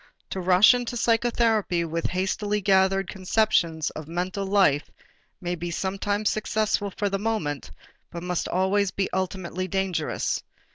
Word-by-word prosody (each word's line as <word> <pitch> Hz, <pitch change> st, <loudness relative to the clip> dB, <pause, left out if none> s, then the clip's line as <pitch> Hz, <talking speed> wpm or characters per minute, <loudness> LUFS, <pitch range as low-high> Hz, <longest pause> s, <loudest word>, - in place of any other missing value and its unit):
To 190 Hz, -, -3 dB
rush 185 Hz, +6 st, +6 dB
into 245 Hz, 0 st, -2 dB
psychotherapy 225 Hz, -6 st, +2 dB
with 165 Hz, +1 st, -2 dB
hastily 205 Hz, +3 st, -1 dB
gathered 195 Hz, -1 st, +3 dB
conceptions 185 Hz, -5 st, +1 dB
of 155 Hz, -1 st, -8 dB
mental 185 Hz, +4 st, -3 dB
life 190 Hz, -8 st, +3 dB, 0.5 s
may 175 Hz, -1 st, -3 dB
be 175 Hz, 0 st, -4 dB
sometimes 200 Hz, +4 st, -1 dB
successful 215 Hz, -1 st, 0 dB
for 205 Hz, +2 st, -2 dB
the 195 Hz, 0 st, -1 dB
moment, 200 Hz, -, -2 dB, 0.4 s
but 170 Hz, 0 st, -7 dB
must 180 Hz, -1 st, -2 dB
always 190 Hz, +2 st, +1 dB
be 195 Hz, +1 st, -2 dB
ultimately 185 Hz, -1 st, -2 dB
dangerous. 185 Hz, -4 st, -1 dB
190 Hz, 135 wpm, -25 LUFS, 175-205 Hz, 0.5 s, rush